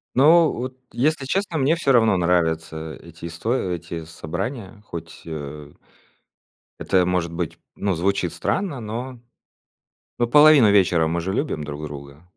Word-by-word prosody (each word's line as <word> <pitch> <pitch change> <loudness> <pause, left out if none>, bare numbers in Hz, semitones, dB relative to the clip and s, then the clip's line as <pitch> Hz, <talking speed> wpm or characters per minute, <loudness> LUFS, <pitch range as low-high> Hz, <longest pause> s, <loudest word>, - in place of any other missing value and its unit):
Но 160 +4 +6
вот, 130 +1 -5
если 140 +2 0
честно, 180 +2 -1
мне 140 +4 +3
всё 160 -5 +1
равно 115 -6 +4
нравятся 80 -2 0
эти 85 0 -12
исто 85 +8 -2
эти 85 -7 -3
собрания, 95 - -6
хоть, 80 -1 -8
э, 75 -2 -7 1.1
это, 90 -1 +2
может 90 -2 0
быть, 85 -2 -4 0.2
ну, 100 -2 0
звучит 90 0 0
странно, 145 - -2
но 120 +3 -6 1.0
но 120 - +3
половину 145 -4 +7
вечера 90 -5 +4
мы 85 +1 -1
же 95 +3 -3
любим 105 - -2
друг 75 +1 -6
друга. 70 +1 -9
90 Hz, 140 wpm, -22 LUFS, 80-130 Hz, 1.1 s, половину